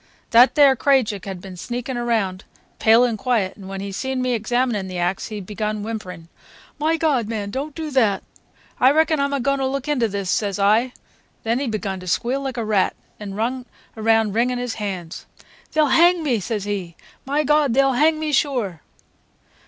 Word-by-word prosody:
That 240 +3 +6
there 280 -3 +6
Krajiek 240 -8 +1
had 190 -3 -6
been 190 -1 -9
sneakin' 245 +7 -5
round, 220 -6 -1 0.4
pale 225 +2 +5
and 235 -4 0
quiet, 225 -7 0
and 195 -2 -11
when 195 0 -5
he 200 0 -5
seen 265 +6 -3
me 255 0 0
examinin' 235 -2 0
the 185 -1 -6
axe, 175 +2 -1
he 215 -2 -6
begun 210 +2 -4
whimperin', 185 -7 -6 0.5
'My 320 +2 +1
God, 280 -9 +1
man, 210 -3 -4
don't 280 +5 -4
do 315 -2 -5
that!' 225 -7 +2 0.6
'I 260 - +6
reckon 315 0 +2
I'm 280 0 0
a 280 - 0
goin' 275 +2 0
to 265 - 0
look 275 +1 -3
into 265 -6 +1
this,' 200 -2 -3
says 200 0 0
I. 215 +5 +2 0.5
Then 230 +2 0
he 280 - -2
begun 200 -4 -3
to 185 - -10
squeal 245 +9 0
like 265 -2 -4
a 230 - -2
rat 205 -3 +1 0.2
and 200 -2 -7
run 245 +3 -2 0.3
about 220 -1 +2
wringin' 245 +3 +1
his 245 -1 -3
hands. 185 -5 -5 0.4
'They'll 310 -1 +3
hang 345 0 +5
me!' 250 -7 +1
says 210 +1 -3
he. 195 -5 -4 0.3
'My 285 +3 0
God, 295 -4 +2
they'll 270 0 +4
hang 310 +4 +3
me 310 -1 -2
sure! 240 - 0
230 Hz, 190 wpm, -21 LUFS, 200-270 Hz, 0.6 s, That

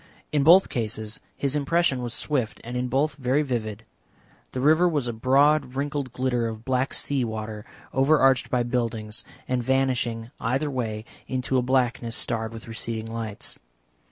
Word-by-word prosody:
In 150 -1 +2
both 175 +6 +7
cases 110 -2 -2 0.2
his 140 0 0
impression 150 -2 +2
was 120 -1 -3
swift 130 -7 -1
and 120 +2 -6
in 125 0 0
both 135 +3 +1
very 135 +2 +2
vivid. 115 -5 -3 0.7
The 130 - -3
river 160 +6 +5
was 145 -6 0
a 120 - -2
broad 135 +3 +3
wrinkled 140 -1 -2
glitter 125 -2 0
of 110 0 -7
black 130 0 +1
sea 140 -3 0
water, 110 -1 -5 0.3
overarched 135 -1 +4
by 125 -1 +2
buildings, 115 -3 -2 0.2
and 125 -1 0
vanishing 120 -3 0
either 135 +5 0
way 110 -4 -3 0.2
into 130 0 0
a - - +2
blackness 125 -2 +1
starred 115 -3 -1
with 115 0 -9
receding 115 0 -4
lights. 110 -3 -5
125 Hz, 155 wpm, -25 LUFS, 115-135 Hz, 0.7 s, both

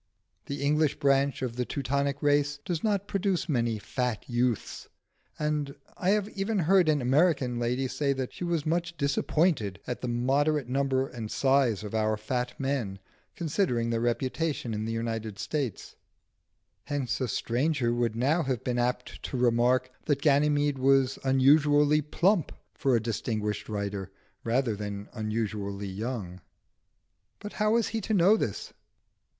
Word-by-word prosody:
The 140 0 -4
English 150 +1 +2
branch 140 -1 +2
of 120 -2 -3
the 125 - +1
Teutonic 140 +2 -2
race 145 0 +2
does 170 -3 -2
not 205 -2 0
produce 195 -6 0
many 120 -7 0
fat 125 +1 -3
youths, 120 -2 -1 0.5
and 150 -2 -1 0.2
I 185 - -1
have 205 0 +2
even 205 +1 -2
heard 180 -1 +4
an 150 -4 +2
American 135 -2 +2
lady 125 +3 0
say 140 +2 0
that 130 -2 -4
she - - -7
was 170 -3 -1
much 170 +1 -1
"disappointed" 140 - +1
at 125 - -4
the 125 - -3
moderate 135 +4 +1
number 135 0 +1
and 115 -5 -7
size 130 -6 +2
of 105 - -7
our 110 -1 +1
fat 125 +3 -3
men, 135 -8 -2 0.4
considering 145 - 0
their 115 - 0
reputation 130 +2 -1
in 105 0 -3
the 115 - -2
United 115 -2 -3
States; 140 -6 -3 0.9
hence 135 -4 -2
a 130 - +1
stranger 120 +2 0
would 120 -2 0
now 140 +9 +2
have 130 -6 -2
been 125 -1 -1
apt 125 +1 -2
to 130 - -3
remark 125 +1 +2
that 145 -2 0
Ganymede 145 -1 +3
was 135 0 +3
unusually 145 +3 +4
plump 175 +4 +1 0.2
for 135 -3 +1
a - - +3
distinguished 110 -1 -3
writer, 100 -2 -3 0.3
rather 115 -1 +1
than 100 0 -6
unusually 105 -3 -3
young. 95 -3 -5 1.0
But 210 0 -8
how 215 0 +1
was 230 -2 +2
he 225 0 -2
to 215 +2 -1
know 190 +3 +6
this? - - -3
130 Hz, 150 wpm, -28 LUFS, 115-150 Hz, 1.0 s, know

